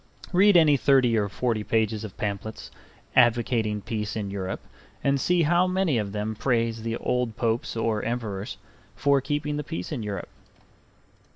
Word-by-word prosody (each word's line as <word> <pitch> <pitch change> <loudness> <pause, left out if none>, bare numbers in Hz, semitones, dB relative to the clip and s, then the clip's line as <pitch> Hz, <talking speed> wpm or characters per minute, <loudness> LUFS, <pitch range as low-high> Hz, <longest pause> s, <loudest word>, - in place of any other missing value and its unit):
Read 195 +1 +6
any 155 -3 +6
thirty 130 -3 +4
or 105 -2 +1
forty 115 0 -1
pages 110 -1 0
of 105 -4 -8
pamphlets 105 +1 -4 0.4
advocating 115 -3 +3
peace 105 0 -3
in 100 -3 -3
Europe 95 -1 -4 0.4
and 140 -1 +2
see 175 +2 +3
how 175 +4 +3
many 185 -8 +1
of 100 -2 -3
them 105 +1 -2
praise 115 0 0
the 115 +1 -2
old 125 -3 -1
Popes 115 -1 -1
or 110 -1 0
Emperors 110 -4 -4 0.4
for 140 -1 +3
keeping 150 +1 -2
the 150 - -3
peace 160 +3 -5
in 140 -6 -3
Europe. 100 -4 -5
115 Hz, 160 wpm, -26 LUFS, 105-140 Hz, 0.4 s, Read